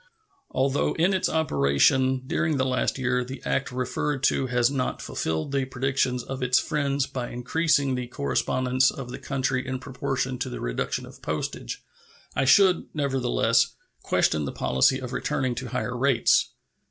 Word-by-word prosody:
Although 135 Hz, +2 st, 0 dB
in 175 Hz, +4 st, +2 dB
its 190 Hz, -, +1 dB
operation 130 Hz, -, +2 dB
during 160 Hz, 0 st, 0 dB
the 130 Hz, -, +1 dB
last 130 Hz, 0 st, 0 dB
year 125 Hz, -1 st, 0 dB
the 130 Hz, +2 st, -7 dB
act 135 Hz, -2 st, -1 dB
referred 130 Hz, +2 st, -2 dB
to 135 Hz, -, +2 dB
has 125 Hz, 0 st, +2 dB
not 130 Hz, -2 st, -2 dB
fulfilled 80 Hz, -, -3 dB
the 135 Hz, -1 st, 0 dB
predictions 130 Hz, -1 st, -1 dB
of 135 Hz, 0 st, -6 dB
its 125 Hz, 0 st, +3 dB
friends 140 Hz, -3 st, 0 dB
by 125 Hz, -3 st, -5 dB
increasing 140 Hz, +2 st, +1 dB
the 125 Hz, -1 st, -3 dB
correspondence 130 Hz, -, +1 dB
of 125 Hz, -2 st, -7 dB
the -, -, -6 dB
country 130 Hz, -1 st, -1 dB
in 130 Hz, 0 st, -2 dB
proportion 130 Hz, 0 st, -3 dB
to 130 Hz, -, -2 dB
the 125 Hz, -, -6 dB
reduction -, -, -2 dB
of -, -, -14 dB
postage, 75 Hz, -5 st, -4 dB, 0.5 s
I -, -, +1 dB
should, 185 Hz, +5 st, +5 dB
nevertheless, 125 Hz, -4 st, +1 dB, 0.3 s
question 75 Hz, -2 st, +1 dB
the -, -, -3 dB
policy 65 Hz, -, +2 dB
of 130 Hz, -1 st, -6 dB
returning 130 Hz, 0 st, -1 dB
to 125 Hz, +2 st, -5 dB
higher 125 Hz, 0 st, -3 dB
rates. 125 Hz, -1 st, +3 dB
130 Hz, 160 wpm, -26 LUFS, 125-135 Hz, 0.5 s, should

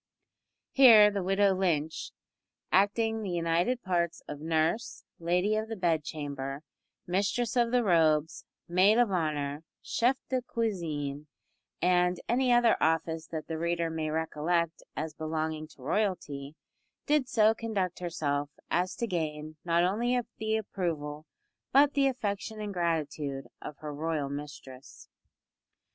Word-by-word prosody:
Here 225 Hz, -6 st, +8 dB
the 200 Hz, -1 st, -2 dB
widow 195 Hz, +1 st, +3 dB
Lynch 165 Hz, -5 st, -1 dB, 0.6 s
acting 220 Hz, +3 st, +2 dB
the 205 Hz, -, -4 dB
united 175 Hz, +8 st, 0 dB
parts 170 Hz, -2 st, -1 dB
of 150 Hz, -, -6 dB
nurse, 160 Hz, +9 st, -1 dB, 0.2 s
lady 180 Hz, +5 st, +1 dB
of 220 Hz, +1 st, -2 dB
the 225 Hz, -, -3 dB
bedchamber, 145 Hz, -5 st, -2 dB, 0.4 s
mistress 205 Hz, +7 st, 0 dB
of 240 Hz, -1 st, +3 dB
the 250 Hz, -1 st, +3 dB
robes, 160 Hz, -5 st, +2 dB, 0.2 s
maid 185 Hz, +5 st, +4 dB
of 240 Hz, -4 st, +3 dB
honour, 150 Hz, -4 st, -1 dB, 0.2 s
chef 250 Hz, +3 st, +1 dB
de 255 Hz, -1 st, 0 dB
cuisine, 155 Hz, -, -3 dB, 0.6 s
and 180 Hz, 0 st, +3 dB
any 250 Hz, +1 st, +2 dB
other 240 Hz, -1 st, +4 dB
office 160 Hz, 0 st, 0 dB
that 155 Hz, -2 st, -5 dB
the 160 Hz, -1 st, -4 dB
reader 170 Hz, 0 st, -1 dB
may 160 Hz, -1 st, -2 dB
recollect 160 Hz, +1 st, -1 dB
as 155 Hz, 0 st, -4 dB
belonging 155 Hz, 0 st, -3 dB
to 140 Hz, -4 st, -17 dB
royalty 155 Hz, -5 st, -2 dB, 0.5 s
did 290 Hz, -4 st, +2 dB
so 220 Hz, -1 st, +4 dB
conduct 210 Hz, -6 st, -2 dB
herself 145 Hz, -5 st, -2 dB, 0.2 s
as 180 Hz, +1 st, 0 dB
to 235 Hz, -, -2 dB
gain 155 Hz, -5 st, -3 dB
not 170 Hz, 0 st, +2 dB
only 235 Hz, +7 st, +1 dB, 0.2 s
the 220 Hz, 0 st, 0 dB
approval 155 Hz, -7 st, -4 dB, 0.4 s
but 285 Hz, +2 st, +5 dB
the 275 Hz, -2 st, +3 dB
affection 220 Hz, -4 st, -3 dB
and 210 Hz, -1 st, -4 dB
gratitude 150 Hz, -5 st, -2 dB, 0.2 s
of 150 Hz, -, -8 dB
her 150 Hz, -1 st, -6 dB
royal 150 Hz, -1 st, -2 dB
mistress. 140 Hz, -2 st, -9 dB
170 Hz, 130 wpm, -29 LUFS, 155-215 Hz, 0.6 s, Here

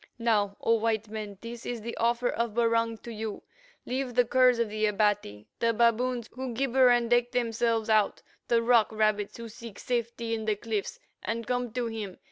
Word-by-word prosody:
"Now, 210 Hz, -4 st, +1 dB
O 230 Hz, -, +2 dB
white 220 Hz, -1 st, -1 dB
men, 210 Hz, -2 st, -6 dB
this 235 Hz, 0 st, -8 dB
is 240 Hz, -2 st, -4 dB
the 235 Hz, -, -5 dB
offer 235 Hz, +1 st, +1 dB
of 230 Hz, -2 st, -2 dB
Barung 230 Hz, -1 st, +2 dB
to 235 Hz, -, -7 dB
you: 220 Hz, -1 st, -5 dB, 0.4 s
Leave 255 Hz, -1 st, -3 dB
the 245 Hz, -1 st, +4 dB
curs 255 Hz, 0 st, +4 dB
of 235 Hz, -1 st, +1 dB
the 215 Hz, 0 st, 0 dB
Abati, 205 Hz, -, 0 dB
the 230 Hz, 0 st, +2 dB
baboons 235 Hz, +1 st, +2 dB
who 255 Hz, -1 st, -5 dB
gibber 260 Hz, 0 st, +4 dB
and 240 Hz, -1 st, +3 dB
deck 240 Hz, 0 st, +3 dB
themselves 230 Hz, -2 st, 0 dB
out, 215 Hz, -2 st, +2 dB, 0.2 s
the 230 Hz, -1 st, +3 dB
rock 230 Hz, -2 st, +4 dB
rabbits 215 Hz, -2 st, 0 dB
who 230 Hz, 0 st, -7 dB
seek 225 Hz, -1 st, -10 dB
safety 235 Hz, -1 st, -2 dB
in 220 Hz, -1 st, -3 dB
the 215 Hz, -1 st, +1 dB
cliffs, 210 Hz, -1 st, -4 dB, 0.2 s
and 230 Hz, 0 st, -3 dB
come 245 Hz, -1 st, -1 dB
to 245 Hz, -1 st, -1 dB
him. 215 Hz, -5 st, -5 dB
230 Hz, 190 wpm, -28 LUFS, 215-240 Hz, 0.4 s, the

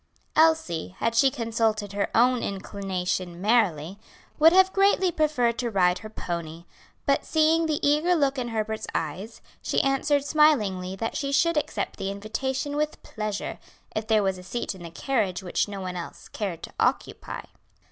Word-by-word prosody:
Elsie, 310 Hz, -, +2 dB
had 230 Hz, -, 0 dB
she 250 Hz, +4 st, +5 dB
consulted 225 Hz, -5 st, -1 dB
her 200 Hz, 0 st, -1 dB
own 250 Hz, +1 st, +4 dB
inclination 185 Hz, -3 st, -3 dB
merely, 195 Hz, -5 st, +1 dB, 0.4 s
would 320 Hz, +2 st, +8 dB
have 375 Hz, +1 st, +5 dB
greatly 390 Hz, -2 st, +3 dB
preferred 260 Hz, -7 st, +1 dB
to 245 Hz, -2 st, -1 dB
ride 180 Hz, -4 st, +2 dB
her 215 Hz, -, -9 dB
pony, 170 Hz, -4 st, -5 dB, 0.4 s
but 275 Hz, 0 st, +2 dB
seeing 320 Hz, +1 st, +3 dB
the 305 Hz, -2 st, 0 dB
eager 305 Hz, +5 st, +3 dB
look 280 Hz, -4 st, +1 dB
in 245 Hz, -, -2 dB
Herbert's 220 Hz, -1 st, -3 dB
eyes, 185 Hz, +9 st, -4 dB, 0.2 s
she -, -, 0 dB
answered 275 Hz, +1 st, +1 dB
smilingly 210 Hz, -13 st, +2 dB
that 225 Hz, +4 st, -3 dB
she 275 Hz, -1 st, -2 dB
should 335 Hz, +4 st, +3 dB
accept 220 Hz, -8 st, -2 dB
the 195 Hz, -, -3 dB
invitation 260 Hz, +8 st, -3 dB
with 300 Hz, +1 st, -2 dB
pleasure, 215 Hz, -2 st, -4 dB, 0.4 s
if 215 Hz, 0 st, -2 dB
there 215 Hz, -2 st, +3 dB
was 190 Hz, -1 st, -1 dB
a -, -, -11 dB
seat 205 Hz, +6 st, -3 dB
in 190 Hz, -, -13 dB
the 170 Hz, -, -7 dB
carriage 195 Hz, -1 st, -1 dB
which 180 Hz, -, 0 dB
no 200 Hz, -1 st, -6 dB
one 185 Hz, -1 st, -5 dB
else 175 Hz, -1 st, -8 dB
cared 190 Hz, -6 st, -4 dB
to -, -, -8 dB
occupy. -, -, -1 dB
220 Hz, 165 wpm, -26 LUFS, 190-285 Hz, 0.4 s, would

